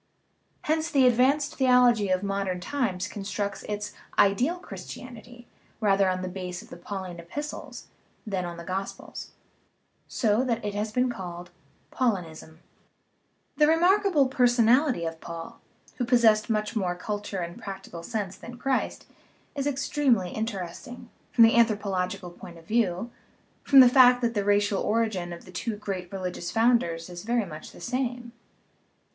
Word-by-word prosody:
Hence 315 +1 0
the 275 -3 +4
advanced 270 +5 +3
theology 250 -5 +4
of 185 +1 +1
modern 195 -2 -2
times 195 -4 -2
constructs 205 -1 -4
its 210 0 -4 0.2
"ideal 240 - +3
Christianity" 245 -7 -10 0.3
rather 195 -3 +3
on 185 0 -2
the - - -3
base 180 -1 -6
of - - -19
the - - -7
Pauline 185 -1 -6
epistles 290 - -7 0.4
than 195 -4 -2
on 175 -1 -6
the 170 - -8
gospels, 190 +2 -5 0.8
so 220 +1 +1
that 235 -4 -1
it 205 - -2
has 210 +1 -2
been 250 +2 +1
called 175 -4 -7 0.4
"Paulinism." 170 -9 -2 1.0
The 300 - +5
remarkable 350 -2 +4
personality 245 - +3
of 165 0 -5
Paul, 165 -1 -8 0.4
who 250 - -1
possessed 230 -3 +4
much 215 0 -1
more 185 -5 0
culture 205 +2 -4
and 170 -1 -5
practical 195 -3 -7
sense 200 0 -4
than 240 +1 -10
Christ, 265 0 -1 0.5
is 280 -1 -2
extremely 265 -8 +1
interesting, 220 +3 -6 0.2
from 235 - +6
the 225 0 +6
anthropological 200 -6 +1
point 175 0 -12
of 165 - -16
view, 220 +1 0 0.5
from 275 -1 +7
the 255 - +9
fact 250 -1 +6
that 235 -1 +1
the 205 -3 0
racial 205 0 +2
origin 210 -5 0
of 170 - -9
the 185 - -12
two 215 +5 -3
great 190 -4 -5
religious 180 -2 -4
founders 225 -7 +2
is 175 -1 -8
very 235 +1 0
much 155 -4 -9
the - - -14
same. 245 -1 -3
210 Hz, 150 wpm, -27 LUFS, 185-245 Hz, 1.0 s, the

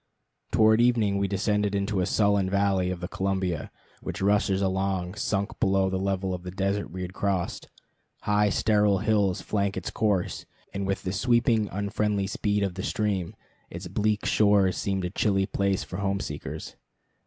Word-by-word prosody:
Toward 110 +1 +5
evening 110 -5 +2
we 100 - +1
descended 105 +1 0
into 100 0 0
the 90 - +1
sullen 100 -3 +2
valley 100 -2 +1
of 90 -1 -4
the 90 - -3
Columbia, 95 -4 -2 0.3
which - - -5
rushes 100 -1 +2
along, 95 -2 -1
sunk 100 0 -2
below 95 -2 +2
the 95 - -1
level 95 -1 -1
of 90 - -4
the 90 - -7
desert 100 +2 -1
we 90 +3 -5
had 90 +1 -6
crossed. 95 -3 -2 0.5
High 105 0 +2
sterile 105 -1 +3
hills 100 -2 +1
flank 100 -1 -1
its - - -4
course, 105 -5 -1 0.3
and 100 0 -3
with 95 - -2
the 90 - -2
sweeping, 115 -1 +2
unfriendly 100 0 -1
speed 105 +1 -1
of 95 -2 -1
the 95 - -5
stream, 100 -5 -1 0.3
its 90 +2 -7
bleak 105 +3 0
shores 100 -3 +3
seemed 95 -2 -1
a 90 - -3
chilly 95 -1 +1
place 100 -1 0
for 90 - -7
home 100 -1 -1
seekers. 75 -6 -6
100 Hz, 170 wpm, -26 LUFS, 95-105 Hz, 0.5 s, Toward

